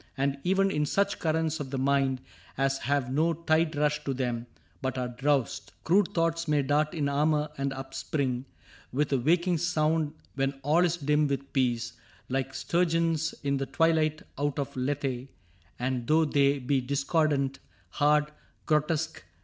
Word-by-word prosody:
And 140 +1 0
even 195 +2 +2
in 150 -3 0
such 200 +4 +1
currents 160 0 0
of 140 -3 -5
the 135 - -3
mind 135 -1 +1 0.4
As 135 0 +1
have 140 -3 0
no 160 +4 +2
tide 160 0 +1
rush 150 0 +1
to 135 - -1
them, 120 -2 -2 0.3
but 130 -1 -2
are 125 -1 -2
drowsed. 135 +1 -1
Crude 185 +3 +4
thoughts 165 0 +1
may 150 -2 +2
dart 150 +4 +1
in 150 -3 0
armor 150 +1 +1
and 140 -1 -2
upspring 135 -1 -3 0.5
With 145 +2 0
a 135 - +3
waking 170 +5 +2
sound, 155 -2 +1 0.2
when 135 0 -1
all 155 +5 +4
is 175 -1 +1
dim 150 -1 +2
with 140 0 -3
peace, 120 -3 0 0.4
Like 135 +1 -2
sturgeons 165 -2 +1
in 140 -1 +1
the 135 0 -2
twilight 155 +1 +2 0.2
out 145 -1 0
of 140 -1 -3
Lethe; 130 -1 -2 0.5
And 125 -1 -2
though 160 +2 +4
they 140 -1 +3
be 135 +1 0
discordant, 140 0 0 0.3
hard, 150 0 +2 0.3
grotesque. 160 +1 0
145 Hz, 155 wpm, -28 LUFS, 135-160 Hz, 0.5 s, Crude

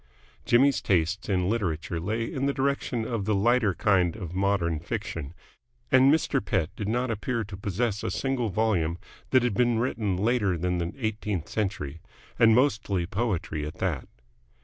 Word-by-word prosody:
Jimmy's 135 +3 +4
tastes 95 +2 0
in 90 -2 +1
literature 85 -6 -1
lay 110 +7 -2
in 135 +4 -2
the 140 - 0
direction 135 -4 -1
of 115 -5 -2
the 105 0 +1
lighter 110 -1 +3
kind 95 -5 +2
of 90 -6 -7
modern 95 -4 +1
fiction, 75 -1 -5 0.6
and 130 +1 +6
Mr. 160 -9 +1
Pett 85 -3 -1
did 105 - -4
not 120 +2 0
appear 115 +2 -2
to 105 -1 -8
possess 105 +2 -2
a - - -1
single 130 -4 -1
volume 90 -5 +1 0.3
that 130 -2 +4
had 125 -3 +1
been 120 +2 +2
written 110 -5 -1
later 105 -3 +1
than 90 +1 -1
the 85 0 -2
eighteenth 105 - -2
century 85 -8 -3 0.4
and 115 -1 +6
mostly 110 -8 +1
poetry 95 -6 -2
at 75 +3 -6
that. 85 -9 -2
105 Hz, 165 wpm, -27 LUFS, 90-120 Hz, 0.6 s, and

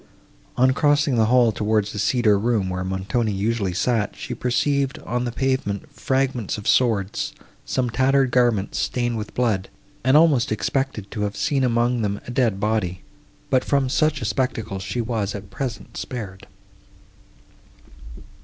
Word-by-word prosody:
On 130 +1 +5
crossing 145 0 +2
the 110 -2 +3
hall 120 -1 +4
towards 105 0 0
the 105 - -4
cedar 110 0 +3
room, 105 -4 0
where 90 0 -2
Montoni 95 +5 -1
usually 100 0 -1
sat, 110 +2 0
she 125 - -6
perceived, 135 +3 0
on 125 +1 -1
the 120 - -2
pavement, 130 -6 -2
fragments 130 -6 -1
of 105 - -7
swords, 105 -6 +1 0.3
some 130 -1 0
tattered 130 +1 +2
garments 120 -6 +2
stained 120 -1 -1
with 105 -1 -6
blood, 110 -6 0 0.3
and 130 +3 +5
almost 150 -8 +4
expected 125 -2 -2
to 105 - -4
have 105 -1 -2
seen 140 -2 +1
among 120 0 +1
them 100 -1 -1
a - - -6
dead 120 -6 +1
body; 100 -4 -1 0.5
but 130 -2 +3
from 140 -2 +1
such 150 -1 +1
a - - -2
spectacle 110 -2 -2
she 95 +6 -3
was, 110 -4 -2
at 100 -2 -9
present, 135 -6 -5
spared. 100 -7 -6
120 Hz, 155 wpm, -23 LUFS, 105-130 Hz, 0.5 s, On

